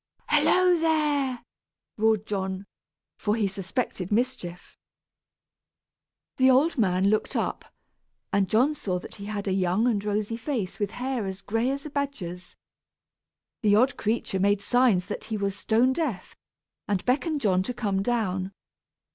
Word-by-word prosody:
"Hallo, 365 -2 +4
there!" 295 -6 +1 0.5
roared 220 -1 +2
John, 190 -1 -3 0.5
for 210 0 +1
he 220 -3 +1
suspected 190 0 -3
mischief. 225 -6 -2 1.6
The 260 0 +5
old 275 +6 +4
man 195 -4 +2
looked 215 - 0
up, - - -2 0.7
and 195 -2 +2
John 250 +9 +3
saw 200 -11 -2
that 180 - -8
he 200 - -9
had 205 -1 -4
a - - +1
young 185 +3 +1
and 215 -5 +1
rosy 210 +2 -1
face 230 -7 -3
with 205 -2 0
hair 245 -2 -3
as 190 0 -6
gray 225 +4 0
as 275 +2 -3
a 300 - -6
badger's. 225 -12 -4 1.1
The 210 -3 +4
odd 255 +5 +3
creature 215 -3 -1
made 200 +1 +3
signs 220 -4 +3
that 205 - -6
he 220 - -3
was 200 -1 -1
stone 235 +5 +2
deaf, 275 - -3 0.5
and 200 -3 -1
beckoned 290 +4 +1
John 185 -4 +3
to 190 - -3
come 200 -5 0
down. 195 -4 -1
215 Hz, 145 wpm, -26 LUFS, 195-255 Hz, 1.6 s, The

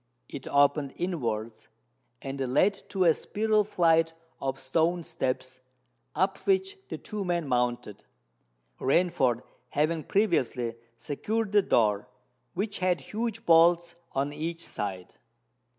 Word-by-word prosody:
It 140 - -8
opened 140 0 +2
inwards, 115 -11 -3 0.6
and 135 0 -5
led 135 +10 +3 0.2
to 190 -2 +1
a 165 -2 +6
spiral 215 +5 +1
flight 165 -5 +3 0.3
of 135 0 -2
stone 165 +6 +1
steps, 130 -5 -3 0.6
up 190 +1 +1
which 385 0 +1
the - - -4
two 210 -2 -5
men 175 -4 -1
mounted, 120 -4 -1 0.8
Rainford 130 -5 +2 0.3
having 155 +3 0
previously 130 - +1 0.2
secured 200 - -2
the 205 0 +5
door, 105 - +2 0.5
which 205 +3 -2
had 180 -2 +2
huge 225 0 -4
bolts 170 +1 +5 0.2
on 140 +2 -1
each 165 +2 -4
side. 95 -3 -5
165 Hz, 120 wpm, -28 LUFS, 130-185 Hz, 0.8 s, a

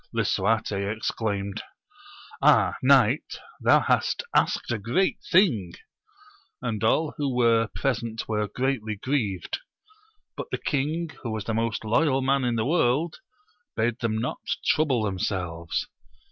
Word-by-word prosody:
Lisuarte 110 +3 +1 0.2
exclaimed. 105 -2 -3 0.8
Ah, - - +5
knight, - - +3 0.3
thou - - +6
hast - - +1
asked - - +2
a 120 - -1
great 125 - 0
thing! 125 - +3 0.9
And 110 -3 -3
all 150 +7 +2
who 140 -4 -1
were 115 -2 +3
present 115 -4 -2
were 105 -1 -1
greatly 125 -3 -2
grieved; 105 -5 -2 0.8
but - - -6
the - - -2
king 155 +3 -1
who 120 - -4
was 110 -2 -3
the 115 - -3
most 115 0 -1
loyal 135 +4 +2
man 135 0 +2
in 120 -1 0
the 110 -1 0
world, 155 +1 +1 0.6
bade 115 +2 0
them 110 -2 -1
not 115 +3 -3 0.3
trouble 145 -7 +2
themselves. 90 -4 -2
115 Hz, 130 wpm, -26 LUFS, 110-135 Hz, 0.9 s, thou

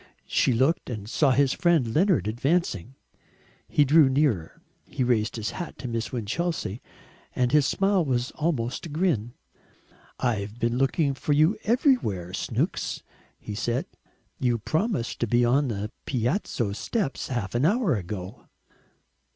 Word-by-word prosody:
She - - +2
looked 130 +8 +1
and 105 -4 -5
saw 140 +5 +2
his 135 +1 +3
friend 160 -10 +2
Leonard 180 - +3
advancing. 130 - -1 0.7
He 145 - +3
drew 145 0 +6
nearer; 130 - 0 0.3
he 130 - -2
raised 115 -3 +1
his 110 -2 -3
hat 175 - -6
to 130 - -6
Miss 115 -1 -3
Winchelsea, 120 - -2 0.5
and 125 -1 +1
his 150 -2 +4
smile 195 -2 +2
was 125 -3 -1
almost 145 -3 -2
a - - -10
grin. 145 - 0 0.9
"I've 105 -3 -1
been 120 +1 0
looking 140 +2 +2
for 145 +2 -1
you 155 +8 +4
everywhere, 210 - +1
Snooks," - - -2 0.4
he 105 - -7
said. 120 +3 -1 0.5
"You 120 -2 +1
promised 160 - -1
to 120 - 0
be 120 +2 +3
on 135 +4 +3
the 105 -1 -3 0.2
Piazza 120 - -1
steps 150 - -2
half 115 -7 -3
an 120 +2 +1
hour 200 - +3
ago." 95 +3 -6
130 Hz, 145 wpm, -26 LUFS, 115-155 Hz, 0.9 s, drew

